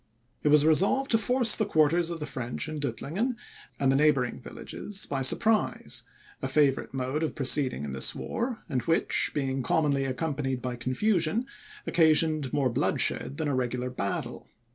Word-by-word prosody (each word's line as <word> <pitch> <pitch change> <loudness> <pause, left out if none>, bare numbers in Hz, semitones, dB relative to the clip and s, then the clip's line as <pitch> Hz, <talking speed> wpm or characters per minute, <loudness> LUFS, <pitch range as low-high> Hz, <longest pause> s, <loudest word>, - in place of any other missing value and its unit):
It - - -1
was 150 0 +5
resolved 195 - +3
to 225 - +4
force 240 0 +4
the 220 - 0
quarters 165 -2 +2
of 170 -1 -5
the 150 - -4
French 125 -1 -5
in 155 -1 -5
Duttlingen, 160 - -2 0.4
and 135 -1 +2
the - - +2
neighbouring 135 -4 +2
villages, 200 -2 -6
by 135 -1 -3
surprise; 215 - +2 0.4
a 135 - -2
favourite 135 0 +1
mode 130 +3 -3
of 160 - -2
proceeding 130 - +1
in 70 - -5
this 65 0 -1
war, 235 0 -4
and 125 - -1
which, 165 0 +3
being 135 -2 -1
commonly 140 0 +1
accompanied 135 0 -2
by 125 0 -4
confusion, 165 - 0 0.4
occasioned 155 -4 +2
more 135 -4 +1
bloodshed 135 +3 0
than 160 -2 -2
a 145 - -1
regular 125 0 -2
battle. 100 -5 -4
145 Hz, 165 wpm, -27 LUFS, 130-165 Hz, 0.4 s, was